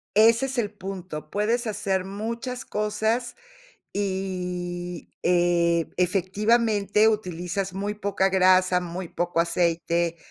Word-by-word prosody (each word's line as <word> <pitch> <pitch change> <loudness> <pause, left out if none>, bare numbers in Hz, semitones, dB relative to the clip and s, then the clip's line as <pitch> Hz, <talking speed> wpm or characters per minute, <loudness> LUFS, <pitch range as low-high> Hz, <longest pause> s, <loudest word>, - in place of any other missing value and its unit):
Ese 230 +4 +5
es 265 -1 -5
el 210 -3 0
punto. 185 -6 -7
Puedes 230 +4 0
hacer 195 -3 -1
muchas 230 +6 -4
cosas 220 +3 -1 0.6
y, 180 -3 -3
eh, 170 -1 +2
efectivamente 205 +3 +2
utilizas 185 -2 -2
muy 200 +2 -2
poca 200 -2 0
grasa, 185 -1 +4
muy 180 +1 -5
poco 175 -1 -1
aceite. 170 0 +1
190 Hz, 105 wpm, -25 LUFS, 175-210 Hz, 0.6 s, Ese